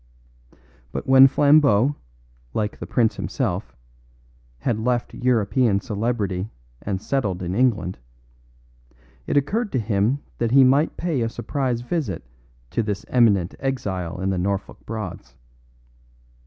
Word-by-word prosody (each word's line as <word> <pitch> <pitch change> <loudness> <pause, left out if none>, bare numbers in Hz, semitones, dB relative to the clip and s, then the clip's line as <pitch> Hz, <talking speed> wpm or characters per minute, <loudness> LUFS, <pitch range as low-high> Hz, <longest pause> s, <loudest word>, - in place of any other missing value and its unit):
But - - -4
when 135 0 +8
Flambeau, 140 -3 +4 0.6
like 105 -1 -2
the - - -6
prince 110 -4 +1
himself, - - -3 0.9
had 110 - 0
left 120 +1 -1
European 115 -3 +2
celebrity 105 -2 -2 0.3
and 100 -2 -3
settled 100 -7 -2
in 90 +1 -3
England, 110 - +1 1.3
it - - +1
occurred 205 - 0
to 130 - +2
him 110 +5 0 0.2
that 115 - +1
he 135 +3 +6
might 140 +4 +3
pay 165 -7 -1
a 115 - 0
surprise 125 -1 -2
visit 125 - -3 0.5
to - - 0
this 105 -2 -3
eminent 100 -8 +3
exile 95 -11 -3
in 95 +1 0
the 95 - -1
Norfolk 100 +2 -3
Broads. 90 - -6
115 Hz, 125 wpm, -23 LUFS, 100-130 Hz, 1.3 s, when